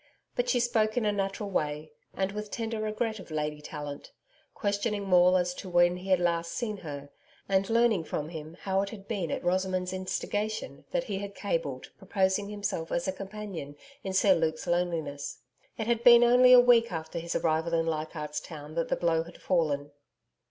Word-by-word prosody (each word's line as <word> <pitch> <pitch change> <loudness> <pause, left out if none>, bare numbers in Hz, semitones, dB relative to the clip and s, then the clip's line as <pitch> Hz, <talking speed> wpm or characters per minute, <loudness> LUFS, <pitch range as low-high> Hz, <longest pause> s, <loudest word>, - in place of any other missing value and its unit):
But - - 0
she - - +3
spoke 225 -2 +1
in 235 - +2
a 210 - +3
natural 200 0 -2
way, 150 -2 -2 0.2
and 195 0 0
with 210 0 -5
tender 225 -1 -3
regret 220 +1 -2
of 190 - -11
Lady 150 -1 -3
Tallant 145 -1 -7 0.4
questioning 205 0 -1
Maule 180 0 +6
as 180 0 0
to 185 - -8
when 175 0 +4
he 185 +2 -8
had 185 -2 +4
last 170 -1 0
seen 215 -4 -3
her, 145 -5 -8 0.4
and 195 0 +1
learning 225 -6 +3
from 150 0 -3
him 160 0 -8
how 195 0 +1
it 200 - -3
had 200 -3 -10
been 195 -7 -2
at - - -3
Rosamond's 185 0 0
instigation 205 -2 -3
that 265 -1 0
he 205 -6 -3
had 200 0 -6
cabled 165 -10 -3
proposing 195 +1 0
himself 200 -6 -3
as 175 - -1
a - - +1
companion 195 -6 -7 0.3
in 190 - -3
Sir 190 +1 +5
Luke's 160 -2 -1
loneliness. 170 -5 -2 0.4
It 220 - -2
had 235 0 0
been 240 -1 +9
only 250 +1 +6
a 250 - +10
week 240 -2 +5
after 165 0 -4
his 170 +1 -4
arrival 160 +1 +1
in 165 0 +1
Leichardt's 155 -1 -3
Town 150 -2 -9
that 165 0 -1
the - - +1
blow 165 -2 +1
had 170 +1 -11
fallen. 145 -5 0
185 Hz, 190 wpm, -29 LUFS, 165-210 Hz, 0.4 s, a